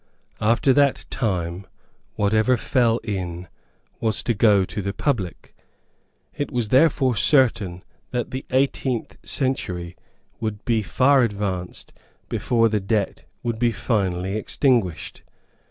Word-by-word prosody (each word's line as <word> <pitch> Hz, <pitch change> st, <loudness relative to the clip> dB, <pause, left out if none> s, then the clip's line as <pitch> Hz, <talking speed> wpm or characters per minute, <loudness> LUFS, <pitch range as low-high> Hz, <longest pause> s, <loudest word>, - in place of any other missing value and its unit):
After 115 Hz, +5 st, +3 dB
that 140 Hz, 0 st, +2 dB
time, 95 Hz, -, -2 dB, 0.5 s
whatever 110 Hz, +4 st, +2 dB
fell 120 Hz, -2 st, +2 dB
in 90 Hz, -5 st, -4 dB, 0.5 s
was 110 Hz, -2 st, 0 dB
to 120 Hz, -, +1 dB
go 105 Hz, -3 st, +4 dB
to 105 Hz, -, -5 dB
the 100 Hz, 0 st, -3 dB
public. 110 Hz, -, -3 dB, 0.8 s
It 145 Hz, -, -4 dB
was 120 Hz, -5 st, -1 dB
therefore 130 Hz, -2 st, +3 dB
certain 110 Hz, -, +2 dB, 0.3 s
that 120 Hz, -1 st, -3 dB
the 130 Hz, +1 st, -4 dB
eighteenth 130 Hz, -2 st, 0 dB
century 90 Hz, -, -2 dB, 0.4 s
would 110 Hz, -2 st, -4 dB
be 115 Hz, -2 st, +2 dB
far 130 Hz, +6 st, +3 dB
advanced 100 Hz, -5 st, -3 dB, 0.4 s
before 115 Hz, -1 st, +2 dB
the 110 Hz, -1 st, 0 dB
debt 100 Hz, 0 st, -2 dB, 0.2 s
would 115 Hz, -2 st, -2 dB
be 120 Hz, -1 st, +3 dB
finally 95 Hz, -4 st, -1 dB
extinguished. 110 Hz, -, 0 dB
110 Hz, 120 wpm, -23 LUFS, 95-125 Hz, 0.8 s, go